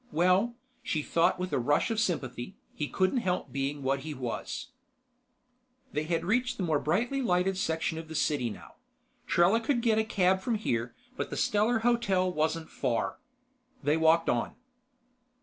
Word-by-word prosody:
Well, 185 +8 +3 0.3
she 155 -3 -1
thought 170 +4 +2
with 185 0 -4
a - - +2
rush 145 - +2
of 225 - 0
sympathy, 155 - -2 0.2
he 150 - -3
couldn't 190 - +1
help 180 - -2
being 140 +2 -2
what 135 +1 +1
he 150 +2 -6
was. 130 - -4 1.2
They 150 +1 -2
had 165 +1 -1
reached 250 +6 +1
the 190 - -2
more 155 -4 +2
brightly 235 - 0
lighted 185 -4 +1
section 160 -2 -1
of 165 - -8
the 160 - -8
city 145 -5 +1
now. - - -11 0.5
Trella 180 +6 +4
could 240 0 0
get 220 -2 +3
a - - +3
cab 190 -3 +2
from 235 +3 0
here, 120 - -2 0.2
but - - -3
the - - -5
Stellar 225 -1 +2
Hotel 195 -7 +2
wasn't 160 +1 -1
far. 125 -4 -1 0.6
They 145 +2 +3
walked 160 +1 +4
on. 120 - 0
175 Hz, 165 wpm, -29 LUFS, 150-215 Hz, 1.2 s, Trella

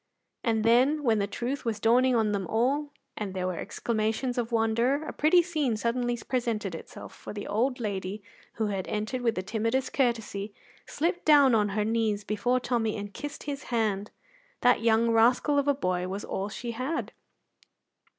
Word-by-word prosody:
And 225 -2 +1
then, 255 +7 +4
when 225 -4 +3
the 200 - 0
truth 245 +6 -3
was 225 -3 -2
dawning 245 +4 +4
on 220 -2 +2
them 195 -3 -2
all, 270 - +1 0.3
and 200 -3 -5
there 185 -1 -1
were 185 -2 -2
exclamations 225 +4 -1
of 235 0 -2
wonder, 235 +6 +1
a - - -5
pretty 340 +4 +4
scene 300 -10 -1
suddenly 240 +2 -1
presented 230 -7 -1
itself, 165 - -9
for - - -9
the 205 -1 -6
old 250 +5 0
lady, 200 -2 -4 0.3
who 220 - -1
had 195 -2 -3
entered 215 +4 -2
with 230 -2 +1
the 185 - -2
timidest 230 +6 -1
courtesy, 225 -5 -1 0.3
slipped 350 +3 -1
down 285 -4 +6
on 210 -2 +3
her 210 - +1
knees 220 -2 0
before 230 +5 0
Tommy 230 -3 -1
and 205 0 -6
kissed 290 -1 -7
his 285 -1 -5
hand. 215 -4 -1 0.5
That 245 -2 +4
young 230 0 +3
rascal 245 +6 +4
of 285 - -1
a 285 - +3
boy 180 -7 -1
was 195 +2 -5
all 195 +2 -3
she 235 +3 -5
had. 260 +8 -3
230 Hz, 180 wpm, -28 LUFS, 210-255 Hz, 0.5 s, down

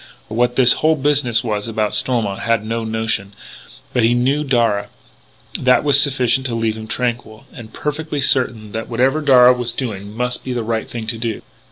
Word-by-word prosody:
What 120 +2 0
this 125 -2 +6
whole 160 +1 +3
business 135 -5 +1
was 105 -2 -3
about 110 -2 -2
Stormont 110 -6 0
had 115 0 0
no 115 +1 -3
notion. 110 -3 -2 0.6
But 125 - +1
he 115 +2 +3
knew 135 +5 +1
Darragh. 115 -7 0 0.7
That 125 0 +3
was 145 -1 +5
sufficient 130 -2 +1
to 120 - -3
leave 115 -1 -1
him 110 0 -9
tranquil, 115 -2 -4
and 115 -2 -11
perfectly 150 +2 -4
certain 120 -5 +1
that 110 +1 -5
whatever 130 +6 +1
Darragh 125 -3 +5
was 120 -1 -2
doing 105 -4 -6
must 125 0 -2
be 130 - -4
the 120 -2 -3
right 110 0 -3
thing 115 -2 -6
to 115 0 -3
do. 115 -2 -3
120 Hz, 185 wpm, -18 LUFS, 110-130 Hz, 0.7 s, this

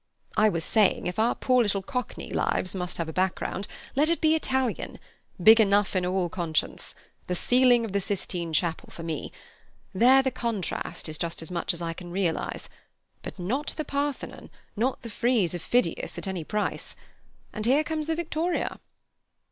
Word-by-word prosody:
"I 215 0 +5
was 165 -5 +1
saying, 215 -3 +3
if 180 +4 -3
our 230 +2 +3
poor 255 -1 +3
little 200 -3 0
Cockney 250 +4 -4
lives 185 - 0
must 180 -2 -3
have 165 - -2
a 160 - -5
background, 190 +2 -1 0.3
let 295 +4 +3
it 335 - +1
be 315 0 +4
Italian. 265 -6 -1 0.4
Big 220 +5 +8
enough 205 -1 +3
in 180 -1 +1
all 185 -1 +1
conscience. 165 -2 -2 0.3
The 180 - -1
ceiling 245 +3 +4
of 220 - -6
the 200 +1 0
Sistine 180 -3 -3
Chapel 160 +1 0
for 165 - -9
me. 160 -3 -4 0.6
There 255 +7 +6
the 265 - +1
contrast 230 -10 -3
is 155 -1 -4
just 165 -1 -2
as 165 - -7
much 175 - 0
as 170 0 -5
I 165 0 -2
can 175 +1 -9
realize. 175 -2 -2 0.5
But - - -8
not 240 +12 -2
the 310 - -2
Parthenon, 285 0 -3 0.3
not 245 +6 -1
the 230 - -6
frieze 230 -6 +2
of 175 - -4
Phidias 245 +7 0
at - - -4
any 185 -4 -3
price; 210 +5 -3 0.6
and 215 0 -3
here 280 +5 +4
comes 310 -1 -3
the 325 - +1
victoria." 340 +1 -1
205 Hz, 180 wpm, -27 LUFS, 180-255 Hz, 0.6 s, Big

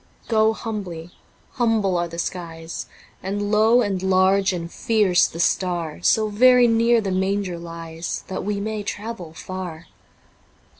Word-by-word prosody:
Go 220 -1 +3
humbly; 185 -7 -6 0.4
humble 225 -6 +1
are 175 0 0
the 170 0 -9
skies, 165 -2 -5 0.3
And 205 +2 -3
low 220 +3 +5
and 195 -3 -2
large 190 +1 +3
and 170 -2 -5
fierce 210 -6 +3
the 165 - -9
Star, 170 -3 0
So 215 +4 +3
very 250 +3 +6
near 230 0 +3
the 195 -2 -3
Manger 190 -1 -1
lies, 165 0 -6
That 190 - -5
we 205 +1 -2
may 215 +1 -3
travel 205 -4 -6
far. 180 -3 -7
190 Hz, 140 wpm, -22 LUFS, 175-215 Hz, 0.4 s, very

